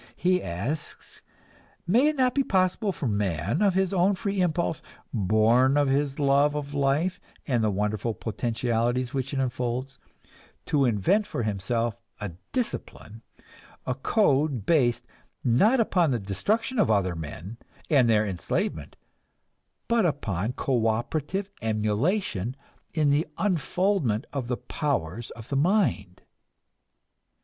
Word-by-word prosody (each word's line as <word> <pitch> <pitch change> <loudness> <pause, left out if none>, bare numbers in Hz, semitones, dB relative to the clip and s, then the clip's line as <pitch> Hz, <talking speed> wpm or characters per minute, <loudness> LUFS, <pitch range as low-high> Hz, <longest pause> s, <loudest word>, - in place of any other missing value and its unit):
He 180 0 +2
asks, 115 - -5 0.6
May 235 - +4
it 305 - +1
not 255 -3 +2
be 275 - +2
possible 190 -1 +1
for 165 - -5
man, 100 - -1
of 200 -3 +3
his 190 0 +1
own 190 +2 +3
free 200 -1 -1
impulse, 170 -2 0 0.3
born 115 +6 +3
of 145 -2 +3
his 140 0 0
love 145 +1 +3
of 145 -1 -4
life 145 +6 +1 0.3
and 120 -5 +1
the 110 - +3
wonderful 105 +2 -1
potentialities 120 +3 -1
which 135 -1 -2
it 140 - -2
unfolds, 125 0 -2 0.7
to 140 -2 +2
invent 125 - +2
for 120 - -3
himself 115 +3 -1 0.2
a 105 - -4 0.2
discipline, 165 - -4 0.6
a 130 - 0
code 140 - +1
based, 125 -6 +2 0.4
not 200 - +4
upon 180 -7 +2
the 125 - +1
destruction 210 - -1
of 210 - +3
other 95 -5 +2
men 80 +7 -7 0.3
and 130 -6 +4
their 110 -1 +3
enslavement, 85 -5 -3 0.9
but 235 -1 +3
upon 115 - -1
cooperative 130 - -1
emulation 110 - 0 0.4
in 150 -3 +2
the 150 +4 +2
unfoldment 180 - 0
of 135 -4 -3
the 125 -1 -1
powers 120 - -3
of 115 -1 -11
the 140 - -1
mind? 140 - +1
130 Hz, 130 wpm, -26 LUFS, 110-175 Hz, 0.9 s, May